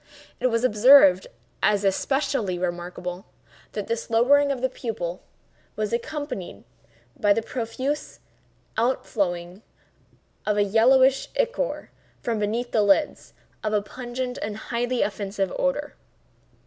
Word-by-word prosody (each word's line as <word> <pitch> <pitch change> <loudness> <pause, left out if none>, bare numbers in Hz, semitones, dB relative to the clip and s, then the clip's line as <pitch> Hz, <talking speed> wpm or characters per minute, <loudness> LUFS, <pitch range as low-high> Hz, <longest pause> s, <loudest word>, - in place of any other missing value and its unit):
It - - +2
was 230 -1 0
observed, 215 -5 +6 0.3
as 205 -1 +2
especially 210 -1 0
remarkable, 180 +1 -4 0.5
that 210 -2 -3
this 230 +1 -3
lowering 280 +5 +4
of 270 - -2
the 260 - +1
pupil 205 -9 -5 0.5
was 215 0 -2
accompanied 240 - -4 0.5
by 205 -1 +3
the 225 - -1
profuse 255 +5 -4 0.6
out 240 +4 +1
flowing 175 -2 -2 0.8
of 210 -1 0
a 205 - +4
yellowish 260 +6 +4
ichor - - -1 0.3
(from 230 -3 -2
beneath 225 +4 -2
the 220 - +3
lids) 205 +9 +1 0.3
of 215 0 -1
a 210 - +2
pungent 250 +3 -5
and 210 0 -4
highly 240 +2 -1
offensive 200 -2 -2
odor. 290 +2 -1
225 Hz, 120 wpm, -24 LUFS, 200-260 Hz, 0.8 s, observed